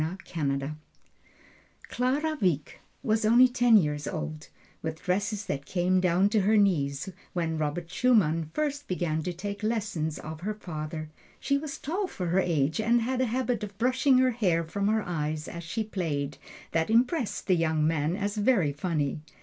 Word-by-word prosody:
Clara 285 +6 0
Wieck 160 -7 0 0.2
was 220 0 +1
only 240 +4 +7
ten 245 -2 +5
years 150 -5 0
old, 155 -1 -5 0.3
with 160 0 -5
dresses 200 +2 -1
that 145 -6 -4
came 185 0 +2
to 190 +4 +3
her 215 +3 +3
knees, 160 -5 +1 0.2
when 165 -3 -1
Robert 155 +3 -2
Schumann 180 -8 +2
first 290 - -2
began 170 -4 -1
to 180 - -3
take 200 +4 -5
lessons 210 -8 -1
of 155 +1 -8
her 210 +3 -3
father. 155 -5 -6 0.3
She 280 - +1
was 290 -1 -6
tall 370 +7 -2
for 180 - -4
her 180 +3 +3
age, 160 -4 +1
and 235 +2 +3
had 255 +2 0
a - - +3
habit 245 -1 -1
of 200 -1 -7
brushing 255 +3 +3
her 255 0 +4
hair 185 -8 +1
from 200 +5 -2
her 215 0 +2
eyes 155 -2 -3
as 170 0 -7
she 220 +7 -2
played, 150 -9 -3 0.3
that 165 +2 +1
impressed 245 +3 +1
the 185 - +3
young 160 -2 +1
man 155 +1 +1
as 205 +1 -2
very 205 - +3
funny. 150 -2 -1
185 Hz, 165 wpm, -28 LUFS, 160-225 Hz, 0.3 s, only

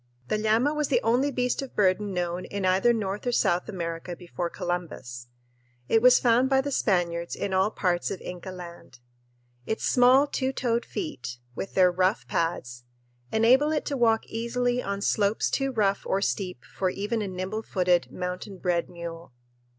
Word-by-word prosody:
The - - +1
llama 225 +7 +2
was 300 -1 0
the - - +3
only 245 +5 +2
beast 250 -1 -1
of 270 - -8
burden 200 0 +2
known 175 0 -2
in 200 -1 -3
either 190 +6 +4
North 210 0 -2
or - - +2
South 180 -6 +1
America 170 -2 -4
before 175 0 -5
Columbus. 155 -10 -5 0.6
It 225 - +3
was 250 +1 +7
found 245 +2 +3
by 270 -1 +4
the 285 +1 -2
Spaniards 170 -7 0
in 200 - -3
all 190 +2 +3
parts 180 -5 0
of 195 - -4
Inca 180 +1 -7
Land. 175 -7 -10 0.7
Its 220 - -2
small 255 +3 +5
two 265 -2 -1
toed 235 -2 0
feet, 305 - -5 0.2
with 195 - -6
their 185 -1 +5
rough 185 +4 +1
pads, 125 -8 -2 0.5
enable 255 +7 +4
it 305 - -1
to 285 - -2
walk 225 -3 +2
easily 245 +2 -1
on 200 -2 -3
slopes 205 0 +1
too 270 -1 0
rough 200 -5 +1
or 195 - +1
steep 185 - -3
for 185 - -2
even 210 +4 -2
a 205 - -2
nimble 185 +3 -4
footed, 180 -4 +1
mountain 180 +2 -5
bred 175 -2 0
mule. 170 -4 -8
200 Hz, 175 wpm, -26 LUFS, 180-240 Hz, 0.7 s, was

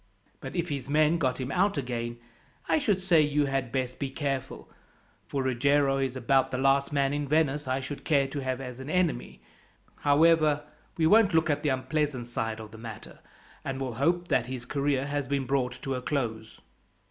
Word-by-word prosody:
But 135 - -8
if 175 -1 -1
his 140 -3 -4
men 155 +3 +3
got 130 -4 0
him 130 +1 -3
out 195 +2 +2
again, 120 -3 -3 0.5
I - - +3
should 210 -10 +1
say 180 -4 +4
you 150 -1 +2
had 135 -3 -2
best 130 0 -2
be 140 - -2
careful, 135 -2 -4 0.6
for 135 -1 -2
Ruggiero 135 +2 +2
is 135 -1 -1
about 130 +1 +2
the 130 - -3
last 135 +2 +2
man 140 -1 +1
in 145 0 -2
Venice 150 -1 +1
I 130 +1 0
should 140 +2 -6
care 140 -4 +2
to 145 - -4
have 130 -1 -2
as 125 -2 -7
an 130 +2 -7
enemy. 145 - -1 0.5
However, 150 0 +4 0.3
we 160 - +2
won't 200 0 +5
look 160 -1 +3
at 145 0 -1
the 150 - 0
unpleasant 130 0 -1
side 115 -2 -3
of 110 -1 -9
the 110 - -11
matter, 115 -2 -9 0.4
and 135 0 -4
will 130 -3 -3
hope 175 +3 +1
that - - +2
his 125 -1 -6
career 140 0 0
has 145 -1 -2
been 140 0 -1
brought 130 -2 -1
to 135 - -2
a 125 - -3
close." 115 -6 -3
135 Hz, 195 wpm, -28 LUFS, 130-150 Hz, 0.6 s, won't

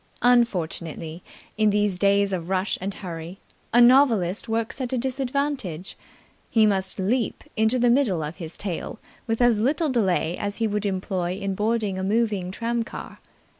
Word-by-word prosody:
Unfortunately, 175 -8 +1 0.4
in 215 -1 +5
these 205 -3 +1
days 200 0 +3
of 175 -1 -3
rush 190 +1 0
and 195 +2 -2
hurry, 175 -2 -7 0.3
a 240 - +5
novelist 240 -6 +4
works 225 +4 -1
at 250 - -3
a 260 - 0
disadvantage. 260 - -2 0.5
He 220 -2 +4
must 190 -2 0
leap 220 +5 -1
into 220 +3 +3
the 240 -1 +4
middle 230 - +2
of 150 +3 -6
his 165 -3 -7
tale 190 -5 -4 0.3
with 225 +1 +1
as 240 -3 +4
little 290 +7 +1
delay 190 -8 +1
as 205 -1 -2
he 230 - 0
would 210 -1 -1
employ 185 -2 -2
in 195 -1 -2
boarding 210 -1 -1
a - - -3
moving 205 -3 0
tramcar. 230 +3 -4
205 Hz, 160 wpm, -24 LUFS, 185-235 Hz, 0.5 s, in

